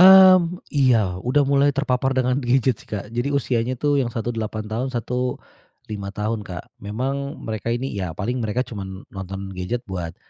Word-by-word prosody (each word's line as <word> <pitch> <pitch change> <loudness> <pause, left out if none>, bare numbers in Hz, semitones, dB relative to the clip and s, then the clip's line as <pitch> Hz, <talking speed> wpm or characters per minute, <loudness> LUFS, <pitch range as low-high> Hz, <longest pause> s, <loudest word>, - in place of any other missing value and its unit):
Mmm, 185 -2 +9
iya. 120 -10 +3
Udah 135 +7 +3
mulai 140 +1 +4
terpapar 135 -1 0
dengan 130 +1 +2
gadget 130 -1 +2
sih - - -23
Kak, 105 +1 -5
jadi 120 +3 0
usianya 130 -3 0
tuh 145 +2 +2
yang 125 - 0
satu 120 0 -3
8 110 -1 -3
tahun, 110 +5 -2
satu 125 0 -1 0.6
5 100 -2 -4
tahun 105 +2 -2
Kak. 90 -5 -8
Memang 135 +7 -3
mereka 110 0 -3
ini 120 +3 -1
ya 90 -5 -4
paling 120 +6 -1
mereka 115 +3 0
cuman 95 -3 -7
nonton 95 0 -6
gadget 115 +7 -3
buat, 90 -5 -5
120 Hz, 175 wpm, -23 LUFS, 105-135 Hz, 0.6 s, Mmm